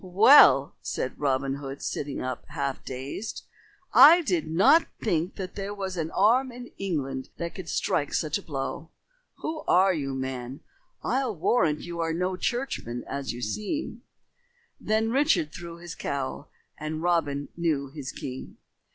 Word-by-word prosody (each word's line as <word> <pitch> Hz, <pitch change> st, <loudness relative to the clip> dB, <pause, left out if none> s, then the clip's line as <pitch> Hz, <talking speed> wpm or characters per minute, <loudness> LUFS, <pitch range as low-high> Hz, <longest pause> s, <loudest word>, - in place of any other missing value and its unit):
"Well," 205 Hz, +10 st, +7 dB
said -, -, -4 dB
Robin 135 Hz, -1 st, 0 dB
Hood, 140 Hz, -1 st, -7 dB
sitting 145 Hz, -1 st, -3 dB
up, 130 Hz, -1 st, -4 dB
half 140 Hz, -3 st, -3 dB
dazed, 135 Hz, -, -6 dB, 0.5 s
"I 335 Hz, +4 st, +9 dB
did 175 Hz, -, 0 dB
not 195 Hz, -, +5 dB
think 175 Hz, -4 st, -1 dB
that 185 Hz, -2 st, -6 dB
there 200 Hz, +1 st, -5 dB
was 190 Hz, -2 st, -4 dB
an 160 Hz, -2 st, -2 dB
arm 245 Hz, +8 st, +3 dB
in 245 Hz, 0 st, -10 dB
England 135 Hz, -9 st, -3 dB
that 170 Hz, 0 st, -4 dB
could 185 Hz, -, -8 dB
strike 145 Hz, -, 0 dB
such 155 Hz, +3 st, 0 dB
a -, -, -11 dB
blow. 145 Hz, 0 st, -5 dB, 0.5 s
Who 315 Hz, 0 st, -3 dB
are 190 Hz, +1 st, +5 dB
you, 135 Hz, -5 st, -3 dB
man? 130 Hz, 0 st, -5 dB, 0.4 s
I'll 255 Hz, -3 st, 0 dB
warrant 155 Hz, -3 st, +2 dB
you 170 Hz, -1 st, -6 dB
are 165 Hz, -1 st, 0 dB
no 180 Hz, +2 st, -1 dB
churchman 180 Hz, -, -3 dB
as 140 Hz, -1 st, -3 dB
you 120 Hz, +1 st, -7 dB
seem." 220 Hz, -, -3 dB, 0.8 s
Then 220 Hz, +1 st, 0 dB
Richard 270 Hz, -, +2 dB
threw 170 Hz, -1 st, -8 dB
his 170 Hz, 0 st, -8 dB
cowl, 140 Hz, +1 st, -4 dB, 0.3 s
and 155 Hz, +1 st, -4 dB
Robin 145 Hz, -5 st, 0 dB
knew 150 Hz, -5 st, -1 dB
his 140 Hz, -3 st, -6 dB
king. 130 Hz, 0 st, -7 dB
165 Hz, 150 wpm, -27 LUFS, 140-200 Hz, 0.8 s, I